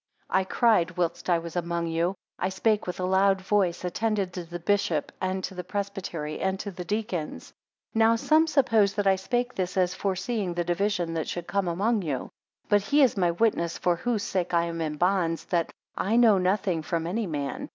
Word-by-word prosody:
12 190 - +3
I - - 0
cried 185 -6 +2
whilst 175 +1 -1
I 175 - +4
was 165 0 -7
among 170 -1 -1
you; 165 +3 0 0.2
I 185 - 0
spake 210 +2 +1
with 180 - -4
a 180 - 0
loud 190 +1 +3
voice: 190 -2 0
attend 215 +4 0 0.2
to 180 - -5
the 170 +1 -7
bishop, 175 -4 0
and 185 0 -1
to - - -4
the 180 -1 -5
presbytery, 190 -7 -4
and 190 0 -1
to 200 - -5
the 180 -1 -7
deacons. 180 - -3 0.4
13 225 - 0
Now 225 +1 +5
some 310 +7 +3
supposed 225 -9 +3
that 205 -1 0
I 195 -1 +5
spake 245 +6 -1
this 185 0 -3
as 180 -1 +2
foreseeing 195 -1 -2
the 175 - 0
division 175 -1 0
that 160 -2 -2
should 175 -1 -4
come 200 0 -1
among 205 +6 +1
you. 150 -7 -1
14 - - -9 0.4
But 205 -1 +4
he 285 +8 +3
is 255 - +3
my 180 -3 +2
witness 170 -2 +1
for 175 -1 +1
whose 225 +1 -1
sake 180 -2 -1
I 170 - +4
am 165 -1 -3
in 155 -2 -2
bonds 175 -1 +1
that 170 -2 0 0.2
I 210 +4 0
know 225 -5 +6
nothing 185 -2 +1
from 165 +1 -2
any 205 +5 -1
man. 155 - -4
185 Hz, 215 wpm, -27 LUFS, 170-205 Hz, 0.4 s, know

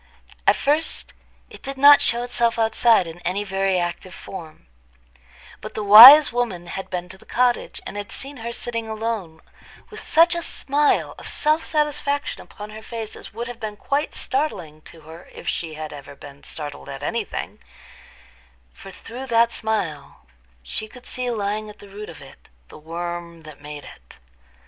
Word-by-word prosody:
At - - +6
first 300 +3 -1 0.4
it - - -12
did 275 0 -6
not 285 +1 +8
show 235 +1 +1
itself 235 -1 0
outside 225 -2 +3
in 165 +1 -9
any 185 +3 -2
very 195 -1 0
active 175 +1 -4
form; 160 - -10 1.0
but 215 - -9
the 215 - -3
wise 235 +7 +11
woman 230 -8 -2
had 190 +2 -6
been 180 -1 -4
to 190 +1 -12
the - - -17
cottage, 245 0 0
and - - -6
had 205 +1 -6
seen 275 +1 -5
her 235 0 -5
sitting 230 -2 -4
alone, 220 -7 -4 0.5
with 435 - -9
such 335 +2 +4
a 340 - -2
smile 290 -2 0
of - - -8
self 310 +2 +1
satisfaction 295 -1 -1
upon 210 +1 -11
her 215 +1 -9
face 225 -1 -7
as - - -11
would 230 +2 -5
have 245 -1 -8
been 210 -1 -6
quite 285 +7 -2
startling 175 - -3
to 165 - -13
her, 160 +3 -13
if - - -12
she 160 -2 -3
had 155 -1 -7
ever 140 0 -11
been 140 0 -13
startled 145 - -8
at - - -7
any - - -1
thing; - - -6 1.1
for - - -12
through 245 +7 -9
that 230 -1 +3
smile 170 -13 -4 0.4
she 215 - -5
could 250 +3 -15
see 250 -1 -3
lying 215 -1 -2
at 210 - -12
the 205 - -14
root 210 +2 -9
of - - -11
it - - -17 0.2
the - - -13
worm 170 +1 -6
that 155 -2 -13
made 150 0 -8
it. 60 - -15
215 Hz, 180 wpm, -22 LUFS, 175-245 Hz, 1.1 s, wise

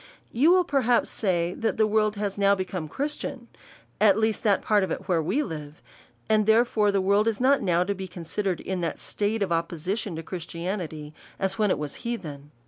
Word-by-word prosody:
You 275 +8 +4
will 365 +1 +5
perhaps 255 -6 +1
say, 175 -4 0
that 225 - -2
the 220 - +4
world 215 0 +1
is 200 -1 -2
now 200 0 +4
become 185 -4 -4
Christian, 270 - -4 0.5
at 205 -1 +5
least 220 -1 +1
that 205 -3 +2
part 210 -2 +3
of 190 - -2
it - - -4
where 170 -3 +2
we 275 - 0
live; 150 - -7 0.5
and 215 -1 +2
therefore 220 -2 +4
the 200 - +1
world 200 +3 +2
is 225 -2 0
not 270 +2 +4 0.3
to 200 - -1
be 190 -1 -6
considered 180 +1 -3
in 190 -1 -3
that 165 - -2
state 210 +1 -1
of 190 - -3
opposition 170 +4 -2
to 165 - -5
Christianity, 170 -3 -5 0.2
as 195 +1 -2
when 210 -1 +3
it - - +2
was 150 -1 -4
heathen. 150 -12 -5
200 Hz, 195 wpm, -26 LUFS, 170-220 Hz, 0.5 s, will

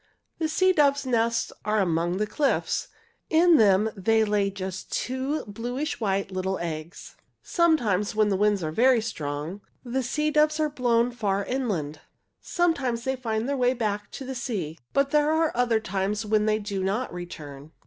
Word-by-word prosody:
"The 320 -1 0
sea 370 +3 +3
doves' 280 -3 +3
nests 230 -2 0
are 215 +1 0
among 175 -1 0
the 210 - +1
cliffs. 270 +7 0 0.4
In 330 +1 +5
them 210 0 +4
they 220 +3 +2
lay 205 -1 +1
just 190 -1 -6
two 260 +4 -2
bluish 245 +8 -4
white 200 -3 -1
little 190 +1 -2
eggs. 165 0 -6 0.3
"Sometimes, 235 - +1
when 215 -1 +3
the 195 - +1
winds 205 -1 +2
are 155 - -2
very 245 +7 +4
strong, 160 -3 -4 0.2
the 260 +1 -2
sea 300 +5 -1
doves 305 +1 +3
are 305 -1 +2
blown 245 -3 +2
far 200 -4 -1
inland. 185 - -2 0.4
Sometimes 280 -10 0
they 265 +1 -1
find 225 -2 -2
their 280 - 0
way 250 0 +2
back 210 -3 -2
to 270 - -6
the 265 - -4
sea. 205 - -4
But 275 0 +1
there 300 0 +3
are 320 0 +2
other 235 -2 +2
times 200 +2 -2
when 215 0 +2
they 215 0 +3
do 200 -3 -3
not 205 +5 -1
return." 155 -5 -8
220 Hz, 170 wpm, -26 LUFS, 195-265 Hz, 0.4 s, In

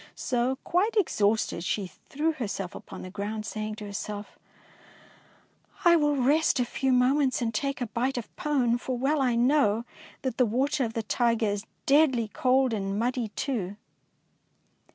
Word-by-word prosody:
So, 250 +1 0
quite 410 +6 +1
exhausted, 215 - +1
she 200 +2 -1
threw 295 - -3
herself 200 - -4
upon - - -9
the 185 - -8
ground, 210 +2 -4
saying 215 0 -4
to 210 - -8
herself, 205 +1 -6 1.5
I 340 0 +7
will 295 -3 +2
rest 285 +3 +3
a 245 - +2
few 265 +2 -1
moments 255 +2 +3
and 230 -2 -1
take 275 +4 -2
a - - +1
bite 250 +4 -1
of 240 - -6
pone, 250 -5 +1
for 255 0 -3
well 275 +4 +1
I 250 -3 +2
know 240 -3 +3 0.4
that 260 -3 -2
the 250 - +4
water 270 +5 +1
of 225 - -5
the 225 - -2
Tyger 230 -1 +1
is 205 +2 -5 0.2
deadly 270 -6 +4
cold 255 +1 +2
and 195 -1 -2
muddy 245 +1 0
too. 210 -8 -2
245 Hz, 160 wpm, -27 LUFS, 215-275 Hz, 1.5 s, I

